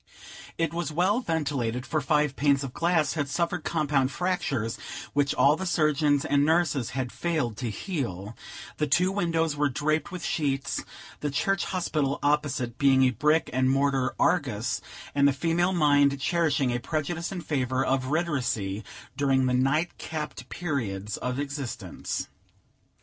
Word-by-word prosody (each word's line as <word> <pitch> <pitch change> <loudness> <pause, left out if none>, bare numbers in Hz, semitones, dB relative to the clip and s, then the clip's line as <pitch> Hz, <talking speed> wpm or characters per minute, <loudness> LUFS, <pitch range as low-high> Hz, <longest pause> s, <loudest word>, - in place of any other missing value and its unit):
It 165 -1 0
was 170 -2 -2
well 185 +8 +2
ventilated, 140 - -1
for 155 0 -1
five 150 0 +1
panes 140 -1 +2
of 130 -2 -6
glass 170 -2 +1
had 145 -3 -2
suffered 170 +3 -1
compound 145 -5 +1
fractures, 140 - -1 0.3
which 140 -1 +1
all 145 +2 +5
the 190 +3 -4
surgeons 150 -4 +2
and 140 0 +3
nurses 155 -6 +2
had 125 -2 -2
failed 155 -10 -1
to 120 -1 -3
heal; 110 - -4 0.4
the 150 - 0
two 180 +5 +3
windows 165 -5 0
were 145 0 +2
draped 155 +5 -1
with 180 -2 -5
sheets, 145 -6 -1 0.4
the 150 - -2
church 185 +7 0
hospital 155 -6 -1
opposite 145 -5 0
being 135 -1 +5
a 130 - +4
brick 150 +7 +2
and 130 0 +2
mortar 135 -1 +1
Argus, 125 - +1 0.3
and 140 0 +4
the 140 - +3
female 170 +5 +1
mind 145 -5 +3
cherishing 145 -4 +1
a 120 - -1
prejudice 160 +4 -3
in 185 -2 -4
favor 130 -4 0
of 130 -1 +1
retiracy 125 - -1 0.3
during 135 -2 +2
the 125 - +1
night 135 +7 +1
capped 155 -2 -5
periods 105 - -3
of 125 0 -3
existence. 140 -3 -4
145 Hz, 150 wpm, -27 LUFS, 130-165 Hz, 0.4 s, all